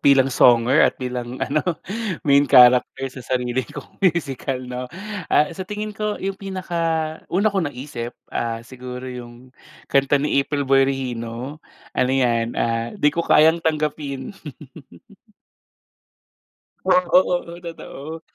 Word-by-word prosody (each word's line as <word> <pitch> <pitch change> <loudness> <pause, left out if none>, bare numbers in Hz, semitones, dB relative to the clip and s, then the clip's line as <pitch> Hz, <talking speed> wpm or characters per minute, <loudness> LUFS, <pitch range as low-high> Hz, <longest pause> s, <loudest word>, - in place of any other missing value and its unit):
bilang 135 -2 +4
songer 120 +4 +5
at - - +4
bilang 125 -1 -5
ano, 150 +3 0 0.6
main 140 0 +4
character 125 0 +6
sa 130 - -9 0.2
sarili 125 0 -1
kong - - -11
musical, 140 -8 0
'no? 125 0 -5 0.4
Ah, 150 +2 +3
sa 165 - -9
tingin 210 +1 -4
ko 210 0 -2
'yong 195 +1 -3
pinaka-una 175 0 -1
kong 190 -6 0
naisip, 125 -3 -7 0.2
ah, 115 -1 -2
siguro 125 0 -8
'yong 125 0 -9 0.4
kanta 140 +1 +4
ni 140 0 +2
April 140 +1 -2
Boy 135 0 +4
Regino. 125 +1 -4 0.3
Ano 125 - +1
'yan, 120 -2 +1
ah, 115 0 -1
"Di 150 0 +3
Ko 170 - -1
Kayang 160 0 +5
Tanggapin." 150 -4 -2 2.5
Oo-oo. 180 -1 +3
Oh, 170 - -8
totoo. 160 -1 -8
135 Hz, 125 wpm, -22 LUFS, 125-160 Hz, 2.5 s, character